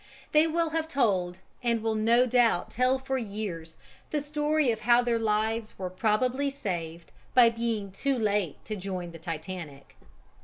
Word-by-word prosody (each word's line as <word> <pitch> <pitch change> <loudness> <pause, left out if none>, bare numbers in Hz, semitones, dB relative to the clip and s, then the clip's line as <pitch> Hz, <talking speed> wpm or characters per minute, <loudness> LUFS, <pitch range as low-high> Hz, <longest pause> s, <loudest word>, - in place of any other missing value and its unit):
They 305 +1 +5
will 330 0 0
have 320 0 -1
told 190 - 0 0.2
and 235 -2 0
will 225 -1 +1
no 230 +3 +4
doubt 240 -7 +2
tell 255 +2 +2
for 265 0 -2
years 200 -7 -5 0.3
the 300 - 0
story 295 -1 +1
of 220 - -3
how 240 +2 +4
their 235 -1 +1
lives 220 0 -1
were 185 -1 -4
probably 245 +8 +1
saved 170 -11 -5 0.2
by 240 -2 +7
being 225 -4 -2
too 275 +7 -1
late 205 - -1
to 215 - -4
join 185 -3 -5
the 165 - -11
Titanic. 160 -3 -7
225 Hz, 160 wpm, -28 LUFS, 185-255 Hz, 0.3 s, by